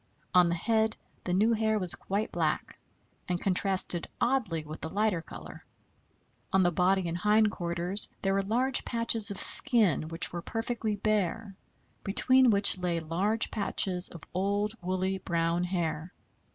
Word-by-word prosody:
On 180 Hz, -1 st, +5 dB
the 170 Hz, -, 0 dB
head 220 Hz, +4 st, 0 dB, 0.3 s
the 180 Hz, -, -2 dB
new 210 Hz, +6 st, +2 dB
hair 220 Hz, -1 st, 0 dB
was 185 Hz, -4 st, 0 dB
quite 205 Hz, +3 st, -3 dB
black, -, -, -2 dB, 0.5 s
and 180 Hz, -1 st, -1 dB
contrasted 185 Hz, -2 st, 0 dB
oddly 230 Hz, -11 st, 0 dB
with 155 Hz, +1 st, -9 dB
the 160 Hz, -, -5 dB
lighter 200 Hz, -1 st, 0 dB
color. -, -, -11 dB, 0.9 s
On 190 Hz, 0 st, +3 dB
the 175 Hz, -, +2 dB
body 185 Hz, +1 st, +1 dB
and 165 Hz, -, -3 dB
hind 210 Hz, +3 st, +2 dB
quarters 175 Hz, +3 st, -2 dB
there 195 Hz, 0 st, +1 dB
were 195 Hz, -, +1 dB
large 245 Hz, +6 st, +1 dB
patches 230 Hz, -2 st, -1 dB
of 200 Hz, -, -4 dB
skin 205 Hz, -, +4 dB
which 165 Hz, +1 st, +1 dB
were 175 Hz, -, -4 dB
perfectly 225 Hz, +1 st, -3 dB
bare, 210 Hz, 0 st, -2 dB, 0.5 s
between 255 Hz, +5 st, +3 dB
which 200 Hz, -3 st, +4 dB
lay 175 Hz, -2 st, -1 dB
large 185 Hz, +8 st, 0 dB
patches 190 Hz, -3 st, 0 dB
of 170 Hz, -, -12 dB
old, 200 Hz, +3 st, -1 dB
woolly, 185 Hz, +1 st, -2 dB
brown 170 Hz, 0 st, -1 dB
hair. 170 Hz, -2 st, -3 dB
195 Hz, 150 wpm, -28 LUFS, 175-215 Hz, 0.9 s, On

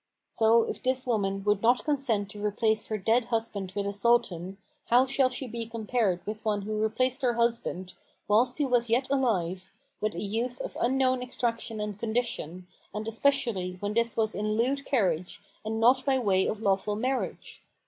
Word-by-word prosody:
So, 225 Hz, 0 st, +4 dB
if -, -, -5 dB
this 260 Hz, 0 st, 0 dB
woman 195 Hz, -5 st, 0 dB
would 205 Hz, -1 st, +2 dB
not 240 Hz, +2 st, +3 dB
consent 240 Hz, -9 st, 0 dB
to 205 Hz, 0 st, -8 dB
replace 215 Hz, +1 st, +1 dB
her 215 Hz, -, -2 dB
dead 225 Hz, +4 st, +2 dB
husband 225 Hz, -5 st, -2 dB
with 200 Hz, -1 st, -1 dB
a 200 Hz, -, -2 dB
Sultan, 200 Hz, -4 st, +1 dB, 0.3 s
how 245 Hz, +2 st, +5 dB
shall 265 Hz, -1 st, +2 dB
she 255 Hz, +1 st, -5 dB
be 230 Hz, -1 st, -5 dB
compared 220 Hz, -5 st, -1 dB
with 215 Hz, +1 st, -5 dB
one 210 Hz, -2 st, 0 dB
who 215 Hz, +1 st, -2 dB
replaced 255 Hz, +5 st, 0 dB
her 250 Hz, -2 st, +2 dB
husband, 230 Hz, -6 st, -1 dB, 0.3 s
whilst 240 Hz, +5 st, +3 dB
he 295 Hz, -, +1 dB
was 245 Hz, -3 st, +1 dB
yet 250 Hz, +3 st, +2 dB
alive, 190 Hz, -9 st, 0 dB, 0.3 s
with 215 Hz, 0 st, -1 dB
a -, -, -4 dB
youth 235 Hz, +5 st, -2 dB
of -, -, -6 dB
unknown 255 Hz, +1 st, +2 dB
extraction 230 Hz, -3 st, -2 dB
and 210 Hz, -1 st, -4 dB
condition, 220 Hz, -7 st, -2 dB, 0.3 s
and 215 Hz, +1 st, -4 dB
especially 225 Hz, -7 st, 0 dB
when 205 Hz, +2 st, -2 dB
this 235 Hz, 0 st, 0 dB
was 220 Hz, -1 st, +1 dB
in 215 Hz, +1 st, -1 dB
lewd 270 Hz, +5 st, 0 dB
carriage 185 Hz, -, 0 dB, 0.2 s
and 220 Hz, +1 st, -3 dB
not 250 Hz, +3 st, +4 dB
by 270 Hz, -2 st, +2 dB
way 195 Hz, -6 st, +2 dB
of 215 Hz, +1 st, -3 dB
lawful 200 Hz, +1 st, +1 dB
marriage? 255 Hz, +4 st, -3 dB
225 Hz, 180 wpm, -28 LUFS, 205-245 Hz, 0.3 s, how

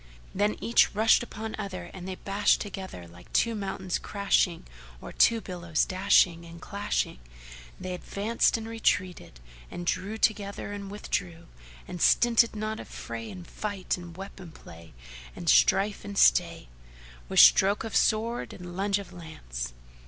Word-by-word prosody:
Then 205 Hz, +2 st, +1 dB
each 230 Hz, -2 st, +3 dB
rushed 220 Hz, +2 st, +5 dB
upon 220 Hz, -2 st, -6 dB
other 185 Hz, -4 st, -6 dB
and 185 Hz, -1 st, -8 dB
they 190 Hz, -, -4 dB
bashed 200 Hz, +2 st, +1 dB
together 190 Hz, -, -7 dB
like 85 Hz, +1 st, -16 dB
two 230 Hz, -, +2 dB
mountains 190 Hz, -3 st, -3 dB
crashing 195 Hz, -4 st, 0 dB, 0.3 s
or -, -, -9 dB
two 230 Hz, -1 st, +4 dB
billows 170 Hz, -5 st, -1 dB
dash 190 Hz, +3 st, +4 dB
ing 170 Hz, -2 st, -11 dB
and 170 Hz, 0 st, -11 dB
clashing: 200 Hz, -, -3 dB, 0.6 s
they 185 Hz, 0 st, -5 dB
advanced 205 Hz, +6 st, 0 dB
and 225 Hz, 0 st, -7 dB
retreated; 185 Hz, -, -1 dB, 0.3 s
and 175 Hz, -, -7 dB
drew 190 Hz, +5 st, -2 dB
together 205 Hz, -2 st, -1 dB
and 200 Hz, -1 st, -7 dB
withdrew; 175 Hz, -4 st, -4 dB, 0.4 s
and 175 Hz, -, -7 dB
stinted 235 Hz, -1 st, +4 dB
not 215 Hz, +1 st, -3 dB
of -, -, -9 dB
fray 115 Hz, -1 st, -7 dB
and 180 Hz, -2 st, -9 dB
fight 205 Hz, -1 st, -3 dB
and 175 Hz, -1 st, -11 dB
weapon 190 Hz, -3 st, -9 dB
play, 85 Hz, -, -14 dB, 0.4 s
and -, -, -8 dB
strife 195 Hz, -, +4 dB
and 200 Hz, -1 st, -7 dB
stay, -, -, +3 dB, 0.6 s
with -, -, +2 dB
stroke 200 Hz, +3 st, +6 dB
of 225 Hz, -, -5 dB
sword 230 Hz, +2 st, +1 dB
and 175 Hz, -1 st, -9 dB
lunge 200 Hz, +1 st, +1 dB
of 200 Hz, -2 st, -9 dB
lance. 60 Hz, -, -7 dB
195 Hz, 150 wpm, -27 LUFS, 175-210 Hz, 0.6 s, stroke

